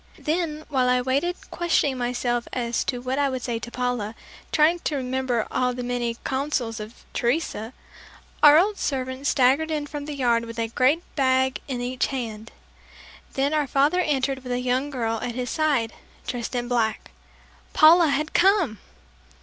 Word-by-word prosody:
Then 310 -1 -2
while 260 -3 +1
I 250 0 +3
waited 275 +8 0 0.2
questioning 330 -5 +1
myself 240 -1 -1
as 240 -2 -1
to 245 -2 -2
what 260 +2 -2
I 285 -1 +2
would 255 -2 -4
say 235 -3 -2
to 230 - -7
Paula, 245 -3 -2 0.4
trying 320 +3 +4
to 310 - -2
remember 255 -3 -1
all 250 -1 0
the 250 - -4
many 240 -1 -2
counsels 260 -4 -2
of 215 +3 -10
Teresa, 240 -3 -1 0.7
our 295 0 +9
old 400 +4 +2
servant 260 0 -2
staggered 275 +4 +3
in 300 -2 -2
from 290 0 -6
the 300 -1 -5
yard 235 -3 +1
with 230 0 -9
a 230 -1 -1
great 265 +8 +2
bag 260 -2 +2
in 255 -3 -3
each 250 +1 -1
hand. 230 -4 -5 0.8
Then 275 +2 0
our 300 -2 +1
father 285 +7 +2
entered 275 -5 0
with 250 -1 -4
a 245 - 0
young 255 +3 0
girl 230 -5 -2
at 240 - -4
his 250 -1 -3
side 280 -8 +1 0.3
dressed 245 0 -4
in 240 0 -2
black. 230 -3 -1 0.6
Paula 330 +2 +7
had 305 +2 -1
come! 355 - +3
260 Hz, 170 wpm, -24 LUFS, 245-295 Hz, 0.8 s, our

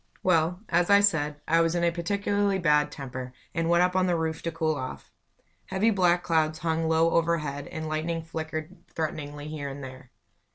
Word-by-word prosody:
Well, 180 0 +2
as 175 +1 +2
I 200 0 +7
said, 150 -7 +1
I 165 +1 +4
was 165 +1 +1
in 170 - 0
a 170 - +3
particularly 200 +3 0
bad 150 -4 +3
temper, 130 -3 -7 0.2
and 165 0 0
went 170 +1 +5
up 180 0 +1
on 185 0 +3
the 175 - +2
roof 160 -1 -2
to 165 - -3
cool 160 -1 0
off. 130 -3 -6 0.6
Heavy 195 +4 +2
black 180 -3 +3
clouds 160 -2 +1
hung 165 -1 -1
low 165 +1 +3
overhead, 155 -4 0
and 160 0 -5
lightning 160 +1 -2
flickered 155 -1 -5
threateningly 150 -2 -4
here 150 -2 -5
and 140 +1 -8
there. 130 -1 -10
160 Hz, 190 wpm, -27 LUFS, 150-175 Hz, 0.6 s, I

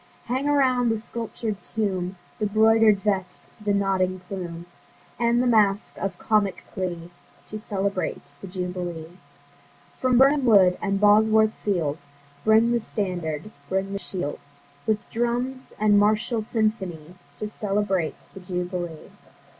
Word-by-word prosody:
Hang 260 +4 -1
around 255 -4 +3
the 225 - +2
sculptur'd 225 -2 -5
tomb 190 -4 -2 0.2
The 210 - +1
'broider'd 220 -1 +4
vest, 190 -3 -2 0.2
the 205 - +1
nodding 190 -2 +1
plume, 175 -2 -6 0.5
And 235 +1 +3
the - - 0
mask 210 -4 +2
of 195 -2 -3
comic 210 -2 +1
glee, 175 -2 -4 0.4
To 215 - -5
celebrate 195 -8 -3
the - - -7
Jubilee. 180 -2 -5 0.8
From 255 -1 +3
Birnam 275 +1 +5
Wood, 195 -6 +6
and 195 -1 0
Bosworth 215 +1 +5
Field, 165 -7 0 0.4
Bring 220 +2 +5
the 240 - +2
standard, 180 -5 -3 0.2
bring 195 +1 -1
the 200 - -2
shield, 180 -7 -4 0.5
With 215 -1 0
drums 245 +3 -2
and 205 -1 +4
martial 215 +2 +2
symphony, 195 -8 -2 0.2
To 215 - -4
celebrate 195 -5 -1 0.2
the - - -9
Jubilee. 180 -2 -5
205 Hz, 130 wpm, -25 LUFS, 180-220 Hz, 0.8 s, Wood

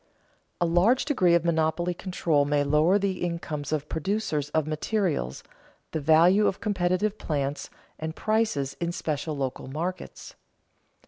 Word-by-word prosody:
_A 175 - +2
large 185 +10 +3
degree 185 - +3
of 170 -1 +1
monopoly 165 +1 +1
control 170 -5 0
may 145 0 +1
lower 150 +7 +3
the 195 -2 -2
incomes 155 -4 -4
of 150 -1 -1
producers 160 -4 -2
of 155 0 0
materials, 155 - -1 0.5
the 160 - -2
value 170 +7 +5
of 195 - -1
competitive 200 +1 0
plants, 140 -2 -2 0.3
and 160 +1 -4
prices 215 -11 0
in 170 0 -1
special 155 -2 -3
local 135 -2 -3
markets. 170 +7 -5
165 Hz, 135 wpm, -26 LUFS, 150-185 Hz, 0.5 s, value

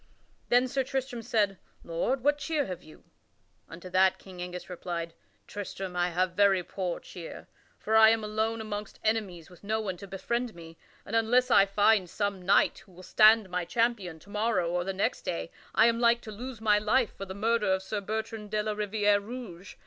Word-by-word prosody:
Then 245 +1 +4
Sir 270 +1 0
Tristram 260 -2 -3
said, 210 -4 0 0.2
"Lord, 205 +11 -1
what 290 +1 +2
cheer 300 -1 -1
have 180 -4 -6
you?" 155 - -16 0.7
Unto 170 +2 -10
that 185 +1 +4
King 185 -2 -11
Angus 180 0 -6
replied: 170 -2 -5 0.3
"Tristram, 195 -2 -6
I 175 0 +1
have 180 +1 0
very 195 0 +3
poor 180 -1 -4
cheer; 170 -2 -10 0.3
for 220 - -1
I 220 0 +8
am 225 -1 +2
alone 220 +1 -1
amongst 210 -1 -6
enemies 200 -7 -1
with 180 - -17
no 220 +2 -1
one 190 -4 -3
to 200 - -10
befriend 235 +5 -3
me, 165 -1 -11 0.3
and 220 - -4
unless 245 +3 +3
I 200 - +6
find 205 -1 +3
some 200 -1 -2
knight 190 +3 +3
who 195 - -20
will 180 +1 -13
stand 215 +1 +5
my 180 0 -1
champion 215 -4 -1
to 205 - -16
morrow 210 -5 0
or 175 0 0
the 195 - -2
next 190 +1 -1
day 170 -1 -4 0.2
I 220 - +6
am 230 0 +3
like 235 0 +4
to 215 - -9
lose 240 +2 -7
my 210 -1 +4
life 220 +3 +1
for 195 - -6
the 190 0 -8
murder 215 -1 +1
of 190 0 +1
Sir 205 +2 -3
Bertrand 220 +1 -4
de 210 0 0
la 215 - -1
Riviere 205 0 +2
Rouge. 200 -5 -9
205 Hz, 200 wpm, -29 LUFS, 185-225 Hz, 0.7 s, I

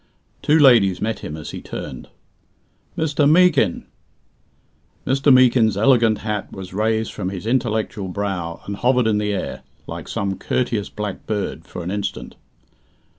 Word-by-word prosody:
Two 150 - +3
ladies 115 - +5
met 110 0 -2
him 75 - -6
as 75 - -7
he - - -7
turned. 65 -2 -7 0.9
"Mr. 145 -2 +2
Meekin!" 160 - +3 1.2
Mr. 135 +2 +3
Meekin's 120 -5 +5
elegant 115 -1 +4
hat 105 -2 -3
was 95 -1 -9
raised 110 +2 0
from 90 - -3
his 95 0 -6
intellectual 110 -4 -1
brow 90 -3 -4
and 100 0 -5
hovered 125 +1 +2
in 105 -2 +2
the 105 0 -1
air, 100 - -4 0.2
like - - -7
some 100 -1 -3
courteous 115 -5 -1
black 105 -2 -6
bird, 100 -5 -3
for 90 - -7
an 90 - -4
instant. 100 -1 -4
105 Hz, 145 wpm, -21 LUFS, 95-125 Hz, 1.2 s, ladies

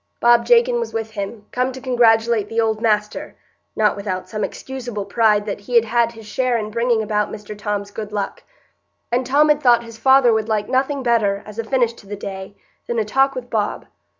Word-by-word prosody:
Bob 240 0 +4
Jakin 480 0 +4
was 470 - -5
with 225 -1 -3
him, 205 0 -6
come 250 +1 0
to 260 - -8
congratulate 230 -4 +2
"the 225 0 -1
old 220 -1 0
master," 210 -2 -1 0.4
not 210 -2 +2
without 195 -2 -4
some 215 -2 -4
excusable 245 -6 -5
pride 215 -2 +2
that 205 -2 -4
he 220 +5 -6
had 230 -1 +5
had 235 +1 +1
his 225 -1 -12
share 245 +3 0
in 215 -1 -4
bringing 235 0 +1
about 210 -1 -1
Mr 210 0 -8
Tom's 205 -1 -4
good 210 0 -6
luck; 205 -1 -4 0.7
and 245 +1 0
Tom 295 +3 +4
had 300 0 +3
thought 240 -3 +4
his 230 -1 -11
father 265 -1 +5
would 220 0 -1
like 210 -1 0
nothing 270 +2 0
better, 210 -5 +1
as 210 +1 -10
a - - -1
finish 240 0 +1
to 205 - -17
the 205 - -5
day, 195 0 -7 0.3
than 235 - -2
a 220 - +1
talk 270 +5 +2
with 245 -1 -7
Bob. 210 -2 -1
225 Hz, 210 wpm, -20 LUFS, 210-245 Hz, 0.7 s, had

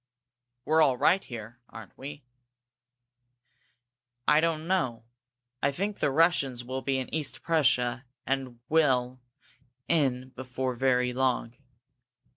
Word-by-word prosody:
"We're 160 +1 +4
all 135 -5 +4
right 185 +9 +3
here, 115 0 -9
aren't 110 0 -11
we?" 145 +2 -9 2.0
"I 150 - +6
don't 160 -1 0
know. 130 -12 0 0.6
I 140 - +2
think 200 +7 -3
the - - +2
Russians 140 -5 +2
will 130 +2 -4
be 135 0 0
in 130 - -5
East 150 -3 -1
Prussia, 125 -5 +2 0.2
and 130 -3 -2
well 130 -5 +2 0.7
in, 130 -5 +1
before 130 0 -4
very 125 0 +1
long. 125 -2 0
130 Hz, 115 wpm, -28 LUFS, 125-155 Hz, 2.0 s, I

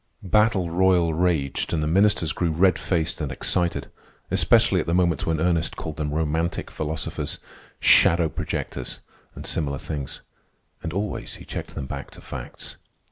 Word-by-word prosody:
Battle 100 -3 +3
royal 90 -2 +3
raged, 80 -5 0
and 80 -2 +1
the - - +1
ministers 90 -1 +3
grew 85 - 0
red 90 +4 +3
faced 85 -2 -1
and 70 -3 -2
excited, 85 +5 -1 0.4
especially - - +4
at - - -2
the 85 - +1
moments 85 -4 +2
when 80 -1 +1
Ernest 85 -1 +1
called 80 -2 -6
them 75 -1 -1
romantic 80 +2 -1
philosophers, 80 0 -3 0.4
shadow 85 0 +6
projectors, 80 -5 -4 0.4
and - - -8
similar 70 -3 -1
things. 70 -2 -5 0.6
And 80 - -4
always 100 +4 -3
he - - -12
checked - - -6
them 70 - -4
back 70 +1 -6
to - - -12
facts. 65 -3 -8
80 Hz, 155 wpm, -24 LUFS, 75-90 Hz, 0.6 s, shadow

